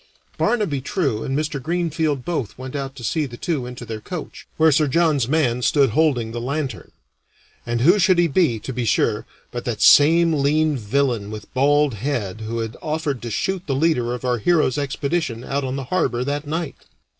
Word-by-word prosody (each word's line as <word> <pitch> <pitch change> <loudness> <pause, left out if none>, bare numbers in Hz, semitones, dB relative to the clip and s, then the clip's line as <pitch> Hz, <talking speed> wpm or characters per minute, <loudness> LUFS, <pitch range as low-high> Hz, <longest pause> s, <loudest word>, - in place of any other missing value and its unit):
Barnaby 200 - 0
True 135 - -1
and 135 +1 -2
Mr. 150 -2 -2
Greenfield 160 -3 -1
both 155 -11 -3
went 130 +2 -7
out 135 -1 -4
to 125 - -10
see 150 +5 0
the 120 -2 -10
two 140 -6 -2
into 125 -1 -8
their 110 -1 -6
coach, 175 - -7
where 160 0 +5
Sir 150 +1 +3
John's 150 -4 +2
man 130 -5 +1
stood 135 0 +3
holding 125 -5 +1
the 120 0 -4
lantern. 140 +2 -4 0.8
And 120 0 -1
who 175 +10 +5
should 185 -1 +4
he 175 0 +4
be, 155 -7 +2
to 130 - -5
be 125 0 -2
sure, 110 -1 +1 0.2
but 120 -1 -5
that 115 -4 -3
same 165 +3 +6
lean 150 +1 +2
villain 120 -2 -1
with 110 -1 -9
bald 145 +1 +3
head 110 -3 -3
who 110 +2 -4
had 110 +1 -5
offered 150 -5 -2
to 120 - -5
shoot 185 - -2
the 135 - 0
leader 130 -5 +1
of 125 - -7
our 125 -1 +1
hero's 150 0 +2
expedition 140 -3 -2
out 140 +2 -2
on 130 0 -3
the 135 - -3
harbor 125 -9 +1
that 145 +2 -3
night! 160 -1 -3
140 Hz, 195 wpm, -21 LUFS, 120-155 Hz, 0.8 s, same